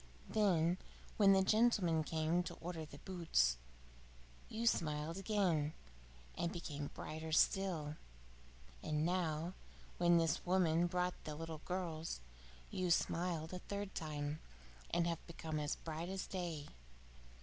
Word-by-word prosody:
Then 180 -5 +3 0.4
when 200 -2 +7
the 190 0 +5
gentleman 195 -7 +4
came 160 +2 +1
to 175 - -5
order 165 -2 -5
the - - -11
boots, 165 - +2 0.9
you 225 +2 -2
smiled 155 -6 +1
again 180 -7 +2 0.6
and 170 0 -1
became 150 -6 -4
brighter 160 +1 -5
still? 160 -3 +2 0.8
And 150 0 0
now, 170 -1 0 0.5
when 175 0 +6
this 165 -2 +2
woman 175 -2 +3
brought 180 +1 -1
the 150 - -5
little 160 0 -5
girls, 165 - -2 0.5
you 185 -1 0
smiled 170 -1 +1
a 180 - -3
third 200 +1 -4
time, 150 -1 -3 0.5
and 170 - +2
have 170 -1 -1
become 160 -2 -3
as 150 -1 0
bright 165 +2 -5
as 190 0 -3
day? 170 -6 -4
170 Hz, 125 wpm, -38 LUFS, 155-180 Hz, 0.9 s, when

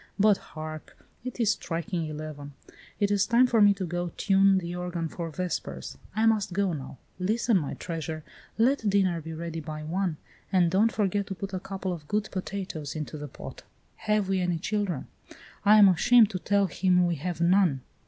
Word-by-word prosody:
But 205 -1 +5 0.2
hark, 155 0 -7 0.3
it 255 0 -6
is 220 -3 +3
striking 170 -3 -3
eleven. 150 -2 -7 0.5
It 205 -1 +2
is 200 0 +2
time 235 +3 +5
for 235 -3 +3
me 205 0 +7
to 195 -1 -3
go 175 +1 -3
tune 195 -1 +4
the 175 -2 -3
organ 175 -2 -3
for 165 +1 -5
vespers. 150 - -4 0.2
I 220 +1 +2
must 215 -4 +2
go 195 -1 +1
now. 135 -3 -7 0.2
Listen, 215 +2 +2
my 145 - -4
treasure; 160 -2 -5 0.3
let 230 -1 +2
dinner 190 -4 +2
be 160 +1 -8
ready 165 0 -5
by 155 -1 -6
one, 175 +1 -1 0.3
and 180 -3 +3
don't 210 +5 +3
forget 205 -1 0
to 195 - -5
put 195 +1 -6
a 185 - -1
couple 190 -1 -4
of 155 -4 -9
good 210 +3 -1
potatoes 185 -6 -5
into 155 0 -5
the 150 -1 -6
pot. - - -10 0.4
Have 210 -2 0
we 190 -1 +1
any 175 -1 0
children! 195 -4 -2 0.6
I 210 +1 +7
am 205 -2 +9
ashamed 215 +5 +5
to 185 - -3
tell 200 +2 +2
him 180 +1 +2
we 175 - +1
have 170 +2 -4
none. 170 -5 +3
185 Hz, 190 wpm, -27 LUFS, 165-205 Hz, 0.6 s, am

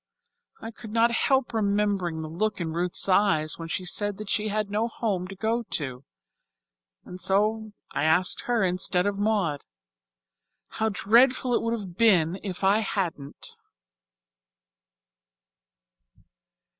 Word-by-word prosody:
I 225 - -7
could 225 -1 -11
not 230 +2 +3
help 265 +1 +1
remembering 200 -6 0
the - - -5
look 200 +6 -2
in 165 -2 -3
Ruth's 175 +3 0
eyes 170 -6 +2
when 165 - -6
she 180 +2 -3
said 205 +2 -1
that 215 -1 -6
she 215 0 +1
had 210 -1 -2
no 215 +3 0
home 205 -6 -2
to 195 - -9
go 225 +4 -1
to, 140 - -5 1.0
and 180 +1 -8
so 215 +2 +1 0.2
I - - -2
asked 170 +4 +2
her 240 -4 +1
instead 180 0 +2
of 205 -1 -1
Maud. 200 -9 0 1.1
How 220 0 -1
dreadful 245 +5 +3
it - - +2
would 230 0 -1
have 185 -4 -9
been 185 -6 +3
if 190 -2 -6
I 200 +3 +4
hadn't." 175 -9 -4
200 Hz, 135 wpm, -26 LUFS, 180-220 Hz, 1.1 s, I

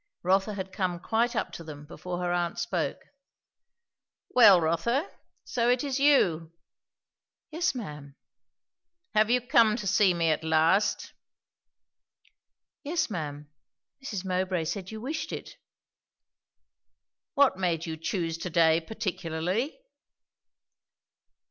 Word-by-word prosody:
Rotha 195 +3 +2
had 190 -1 -6
come 180 -3 -2
quite 235 +5 0
up - - -1
to 165 - -8
them 150 -2 -10
before 175 +3 -6
her 175 0 0
aunt 175 -1 -1
spoke. - - -2 1.3
"Well, 205 -7 +8
Rotha, 175 - 0 0.3
so 240 -1 0
it 245 +2 +2
is 275 -2 -2
you?" 175 - +3 1.0
"Yes, 340 +1 0
ma'am." 150 - -8 1.0
"Have 215 0 +3
you 250 +1 +4
come 230 -3 +4
to 210 - -6
see 195 -2 +3
me 165 -1 +2
at 155 +1 -1
last?" 160 +6 +2 1.7
"Yes, 315 -3 -1
ma'am. 150 -4 -5 0.5
Mrs. 205 -8 -5
Mowbray 185 -2 -1
said 180 +3 -4
you 220 - -7
wished 285 +8 -4
it." - - -7 1.8
"What 275 -9 +4
made 170 -3 0
you 160 -1 -4
choose 165 0 -3
to 180 - -4
day 165 -1 +4
particularly?" 185 - -3
185 Hz, 115 wpm, -28 LUFS, 165-235 Hz, 1.8 s, Well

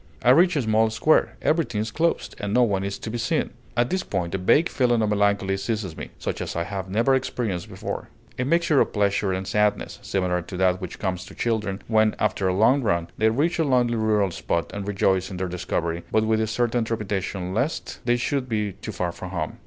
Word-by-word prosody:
I 125 - +6
reach 175 +5 +5
a 145 - +1
small 110 0 +3
square; 115 +8 +2
everything 155 -9 +1
is 110 +1 -2
closed, 165 +1 0
and 105 +1 -2
no 125 - +6
one 100 -4 +1
is 100 0 -3
to 110 - -6
be 120 - -3
seen. 115 - 0 0.3
At 120 0 +2
this 185 0 +1
point 90 - -3
a 95 - -1
vague 145 - +4
feeling 120 -3 +2
of 105 - +1
melancholy 100 -1 +2
seizes 100 -4 -3
me, - - -7
such - - -4
as - - -4
I 85 - 0
have 95 +1 -5
never 115 +7 +2
experienced 120 -8 -2
before; - - -5 0.3
a - - +2
mixture 165 +1 +3
of - - 0
pleasure 100 -1 +1
and 95 +1 -3
sadness, 105 -1 0
similar 90 -2 -1
to 90 +2 -8
that 95 0 +2
which 90 - -6
comes 90 -2 -2
to - - -12
children 105 -4 -1
when, 110 -1 +3
after 100 -2 0
a 90 - +1
long 125 +8 +4
run, 85 -7 0
they 110 0 +4
reach 155 +10 0
a - - +4
lonely 125 -4 +2
rural 105 -3 +2
spot 85 0 -2
and 100 -1 -5
rejoice 95 -2 +1
in 95 - -6
their 95 0 -2
discovery, 85 -1 -2
but 110 0 +3
with 110 0 +2
a 110 - 0
certain 120 +1 0
trepidation 100 -4 -3
lest 130 +10 -2
they 120 0 +2
should 130 +1 -1
be 105 -2 -1
too - - -7
far 90 -1 -2
from 90 +2 -8
home. 85 -4 -4
105 Hz, 225 wpm, -24 LUFS, 95-120 Hz, 0.3 s, I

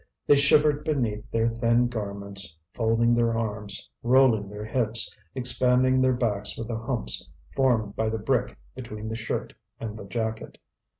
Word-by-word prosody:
They - - +6
shivered 145 +1 +4
beneath 115 -7 -1
their 115 0 +1
thin 115 +1 +2
garments, 100 -6 -4 0.2
folding 115 +1 +2
their 115 -1 +2
arms, 105 -2 -3
rolling 120 -5 +4
their 105 +1 -7
hips, 115 0 0 0.2
expanding 125 +1 +3
their 130 0 +4
backs 110 -5 -2
with 115 0 -5
the 115 -1 -2
humps 120 0 -2 0.3
formed 115 -6 +2
by 110 0 0
the 110 - -2
brick 125 +3 -1 0.2
between 110 -4 -7
the 110 - -3
shirt 115 0 -4 0.3
and 110 -2 -5
the - - -8
jacket. 110 +1 -4
115 Hz, 155 wpm, -26 LUFS, 105-125 Hz, 0.3 s, They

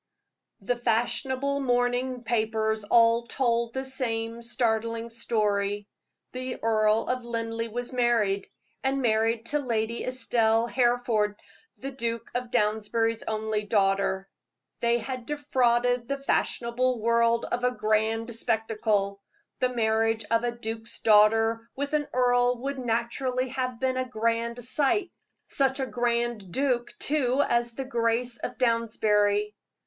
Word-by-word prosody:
The 225 +5 0
fashionable 245 +4 0
morning 245 -1 0
papers 220 -2 0
all 230 +2 +4
told 235 -2 0
the 265 0 -2
same 230 -3 -2
startling 230 -1 -1
story 205 -3 -1 0.5
the 255 0 -5
Earl 215 -1 +2
of 255 -1 -1
Linleigh 230 -1 -3
was 245 +3 -5
married, 230 -5 +1 0.4
and 270 0 0
married 225 0 +1
to 295 - +1
Lady 230 -3 -2
Estelle 230 -3 +1
Hereford, 240 -4 +1 0.4
the 275 - -6
Duke 230 -3 -4
of 245 0 -3
Downsbury's 225 0 0
only 220 -1 -1
daughter. 195 -2 +1 0.5
They 235 0 +2
had 250 +1 -6
defrauded 245 -5 +1
the 280 - -1
fashionable 250 -2 0
world 235 +1 +2
of 245 +1 -3
a 250 - +4
grand 225 0 0
spectacle. 215 -3 0 0.4
The 255 - +2
marriage 225 -2 +1
of 230 +1 +3
a 240 - 0
duke's 225 -1 -5
daughter 225 +2 +4
with 285 +2 -3
an 295 -1 +1
earl 245 0 +3
would 275 0 -3
naturally 250 +2 -1
have 255 -2 -3
been 260 -1 0
a 255 0 -2
grand 230 +1 -1
sight 335 +9 +1 0.3
such 270 -1 0
a 265 - 0
grand 240 -5 -1
duke, 250 0 0
too, 280 -2 +1
as 235 -1 0
his 270 - -3
Grace 235 0 0
of - - -5
Downsbury. 210 -3 +2
235 Hz, 130 wpm, -27 LUFS, 225-250 Hz, 0.5 s, all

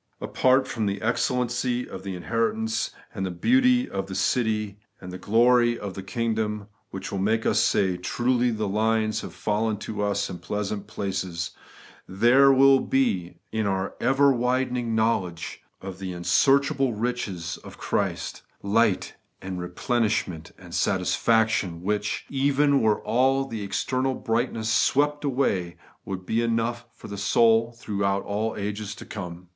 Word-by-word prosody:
Apart 130 +1 +2
from 110 -3 -2
the 100 0 -2
excellency 125 +1 0
of 95 - -8
the 95 -1 -5
inheritance, 110 +3 -1 0.2
and 95 - -4
the 95 - -1
beauty 255 - +3
of 95 - -4
the 95 - -6
city, 105 -4 0 0.2
and 90 - -9
the 90 - -7
glory 120 +4 +3
of 100 -3 -6
the 95 - -6
kingdom, 110 0 -2 0.2
which 95 0 -6
will 100 - -2
make 110 +3 +1
us - - +3
say, 95 -2 +2
'Truly 120 +6 +1
the 110 -2 -2
lines 110 +1 +1
have - - -9
fallen 110 +1 0
unto 105 0 -5
us 100 0 0
in 90 -2 -7
pleasant 100 +2 -4
places,' 95 -5 -3 0.6
there 120 +8 +5
will 135 0 +6
be, 95 -12 0 0.2
in 110 -2 -1
our 95 0 -1
ever 140 +2 +4
widening 125 -2 0
knowledge 95 -7 -1 0.2
of 95 -1 -7
'the 95 -2 -5
unsearchable 135 +8 +2
riches 105 -7 -3
of - - -13
Christ,* - - -2 0.2
light 105 0 +1 0.3
and 95 -1 -5
replenishment 95 -3 -1
and - - -13
satisfaction, 110 -7 +1
which, 105 +1 -1
even 140 +1 +2
were 110 -1 +2
all 135 +4 +2
external 130 +5 -1
brightnesses 115 -1 -1
swept 145 +4 +2
away, 115 -11 0 0.3
would 95 -1 -5
be 115 +4 0
enough 115 +1 -1
for - - -12
the 100 -1 -6
soul 115 +3 +3
throughout 100 -3 -1
all 110 +2 -2
the - - -6
ages 105 0 -4
to - - -10
come. 90 -3 -7
110 Hz, 150 wpm, -25 LUFS, 100-125 Hz, 0.6 s, will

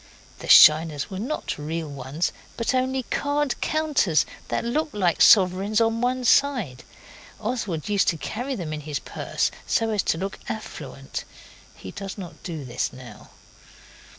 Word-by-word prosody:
The - - -8
shiners 155 +2 +7
were 190 - -5
not 245 - -4
real 160 +2 -4
ones, 140 +4 -3 0.3
but 230 +2 0
only 260 0 0
card 290 -1 -1
counters 300 - +2 0.2
that - - -2
looked 300 +5 -1
like 180 -5 +1
sovereigns 195 +2 +5
on 225 0 +1
one 250 +1 0
side. 235 - +2 0.6
Oswald 210 - -3
used 205 -2 +2
to 165 - +2
carry 245 - -4
them 170 -8 -5
in 150 - -5
his 150 -1 -4
purse - - -2 0.2
so 225 -1 +1
as 210 -2 +1
to 160 - 0
look 195 +3 -5
affluent. 220 - -6 0.5
He - - -9
does 195 -1 -7
not 180 -4 -9
do 160 -6 -6
this 125 -1 -2
now. 125 -4 -12
195 Hz, 150 wpm, -24 LUFS, 155-245 Hz, 0.6 s, shiners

